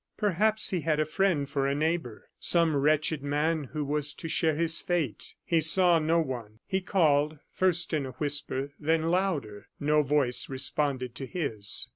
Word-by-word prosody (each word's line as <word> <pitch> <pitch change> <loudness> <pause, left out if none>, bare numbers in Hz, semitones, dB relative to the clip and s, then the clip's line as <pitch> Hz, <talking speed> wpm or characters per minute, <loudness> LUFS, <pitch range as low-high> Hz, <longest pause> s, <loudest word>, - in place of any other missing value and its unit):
Perhaps 215 +2 +1
he 180 -3 -1
had 155 -1 0
a 155 - +2
friend 155 -3 0
for 140 -1 -1
a 140 - 0
neighbor, 155 -6 -2
some 165 -3 +3
wretched 150 +1 +1
man 150 +2 0
who 150 +3 -4
was 150 +1 -2
to 165 - -7
share 160 -1 +1
his 165 +1 0
fate. 165 -10 -2
He 165 -2 +2
saw 175 +2 +4
no 160 +2 +2
one. 120 -8 -4
He 190 0 -1
called, 155 -5 +2
first 175 -2 +2
in 145 -4 0
a - - -7
whisper, 145 -1 -1
then 160 +1 +1
louder. 155 - -1
No 150 +1 +3
voice 140 -3 0
responded 135 -1 -2
to 135 +3 -6
his. 115 - -2
150 Hz, 170 wpm, -28 LUFS, 140-165 Hz, -, saw